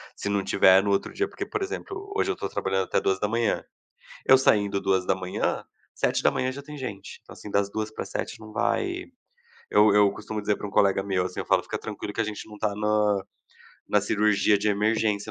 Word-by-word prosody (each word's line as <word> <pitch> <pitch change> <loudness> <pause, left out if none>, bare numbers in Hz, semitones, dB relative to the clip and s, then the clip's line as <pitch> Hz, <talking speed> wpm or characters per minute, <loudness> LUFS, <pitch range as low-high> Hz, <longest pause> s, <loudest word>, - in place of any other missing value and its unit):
Se 100 - -4
não 100 -1 0
tiver 95 0 +5
no 100 - -1
outro 100 - 0
dia, 400 - 0
porque, - - -6
por 425 - -4
exemplo, 400 0 -5
hoje 395 - +1
eu - - 0
estou - - -5
trabalhando 95 0 -1
até - - +1
2h00. 105 +4 0 0.6
Eu 130 - +8
saindo 100 -6 +2
2h00, 95 -1 0 0.3
7h00 130 +1 +1
já 140 +2 -8
tem 150 +1 -10
gente. 125 -8 -7
Então, - - -14
assim, 105 - -10
das 100 0 +1
2h00 110 0 -3
para 110 - -5
às - - -12
7h00 - - -4
não 110 0 -11
vai 360 - -1 0.7
eu 105 0 +5
eu 105 -1 +6
costumo 110 +1 -5
dizer 105 0 0
para - - -7
um 100 - -5
colega 95 -2 +3
meu, 95 -2 0
assim, 90 - -5
eu - - -8
falo: - - +2
"Fica - - -4
tranquilo 105 - -6
que 115 - 0
a - - +1
gente 105 0 -6
não 105 - -11
tá 105 -1 -1
na 105 -2 +1 0.7
na - - +3
cirurgia 105 -1 +2
de 105 +1 0
emergência 105 0 +1
105 Hz, 210 wpm, -26 LUFS, 100-110 Hz, 0.7 s, Eu